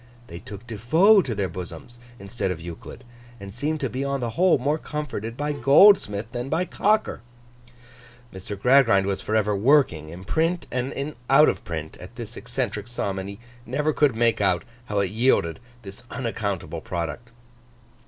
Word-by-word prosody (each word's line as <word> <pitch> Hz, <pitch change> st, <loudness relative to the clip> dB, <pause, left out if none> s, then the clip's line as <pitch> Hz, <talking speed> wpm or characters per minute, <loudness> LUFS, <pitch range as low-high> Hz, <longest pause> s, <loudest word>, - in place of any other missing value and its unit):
They 85 Hz, -, -8 dB
took 100 Hz, +4 st, -10 dB
De 115 Hz, -3 st, -7 dB
Foe 185 Hz, -, +5 dB
to 120 Hz, -10 st, -4 dB
their 100 Hz, -2 st, -1 dB
bosoms, 90 Hz, +6 st, -9 dB, 0.2 s
instead 100 Hz, 0 st, -4 dB
of 90 Hz, -3 st, -3 dB
Euclid, 85 Hz, +8 st, -9 dB, 0.4 s
and 100 Hz, 0 st, -9 dB
seemed 150 Hz, +6 st, -2 dB
to 135 Hz, -, 0 dB
be 130 Hz, +3 st, -4 dB
on 140 Hz, 0 st, -1 dB
the 120 Hz, -2 st, -3 dB
whole 180 Hz, +5 st, +3 dB
more 145 Hz, +5 st, 0 dB
comforted 130 Hz, -8 st, -5 dB
by 150 Hz, 0 st, -1 dB
Goldsmith 135 Hz, -, +5 dB
than 120 Hz, +2 st, -4 dB
by 180 Hz, +6 st, 0 dB
Cocker. 210 Hz, -, 0 dB, 1.1 s
Mr. 95 Hz, +2 st, -7 dB
Gradgrind 125 Hz, -6 st, +4 dB
was 100 Hz, -1 st, -2 dB
for 110 Hz, -, -2 dB
ever 105 Hz, -1 st, +2 dB
working, 100 Hz, -, +3 dB
in 85 Hz, +3 st, -9 dB
print 165 Hz, -, 0 dB
and 135 Hz, +4 st, -3 dB, 0.2 s
out 145 Hz, +3 st, +7 dB
of -, -, -3 dB
print, 80 Hz, -2 st, -6 dB
at 90 Hz, +6 st, -12 dB
this 120 Hz, -2 st, -8 dB
eccentric 125 Hz, -4 st, -4 dB
sum, 100 Hz, -5 st, -3 dB
and 95 Hz, +1 st, -6 dB
he 100 Hz, +1 st, -9 dB, 0.2 s
never 150 Hz, +5 st, -1 dB
could 145 Hz, -6 st, +2 dB
make 115 Hz, -1 st, +2 dB
out 95 Hz, -3 st, +2 dB, 0.2 s
how 105 Hz, -4 st, 0 dB
it 95 Hz, -2 st, -1 dB
yielded 105 Hz, -8 st, +1 dB, 0.2 s
this 95 Hz, -1 st, -9 dB
unaccountable 105 Hz, -7 st, -4 dB
product. 90 Hz, +7 st, -5 dB
115 Hz, 175 wpm, -24 LUFS, 100-140 Hz, 1.1 s, out